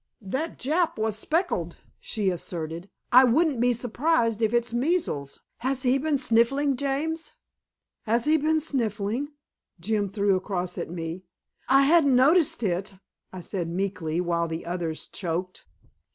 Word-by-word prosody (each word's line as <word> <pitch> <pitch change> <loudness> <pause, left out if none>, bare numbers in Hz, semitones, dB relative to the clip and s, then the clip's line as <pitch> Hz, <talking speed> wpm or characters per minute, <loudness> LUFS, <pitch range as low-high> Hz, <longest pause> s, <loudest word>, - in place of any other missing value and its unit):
"That 265 +11 -4
Jap 325 +5 0
was 220 -1 -1
speckled," 225 - -1 0.2
she 205 -4 -1
asserted. 170 +1 -6 0.2
"I 255 +2 +8
wouldn't 265 +1 +2
be 245 0 +4
surprised 235 -1 0
if 220 -1 +2
it's 235 -1 0
measles. 240 - -1 0.2
Has 260 +2 -2
he 260 +1 +3
been 300 0 +1
sniffling, 270 +3 +2
James?" 290 +5 -2 0.7
"Has 230 +2 +2
he 310 +1 +4
been 315 +1 +2
sniffling?" 235 -3 -1 0.5
Jim 205 +2 -1
threw 200 0 +1
across 185 -1 -3
at - - -4
me. 170 +1 -6 0.4
"I 270 +1 +6
hadn't 285 -2 +5
noticed 285 0 +4
it," 195 +1 -2 0.4
I 185 - -7
said 175 -2 -4
meekly, 175 -3 -2
while 170 -1 0
the 165 0 -5
others 170 -2 -3
choked. 180 0 -4
230 Hz, 140 wpm, -26 LUFS, 185-275 Hz, 0.7 s, I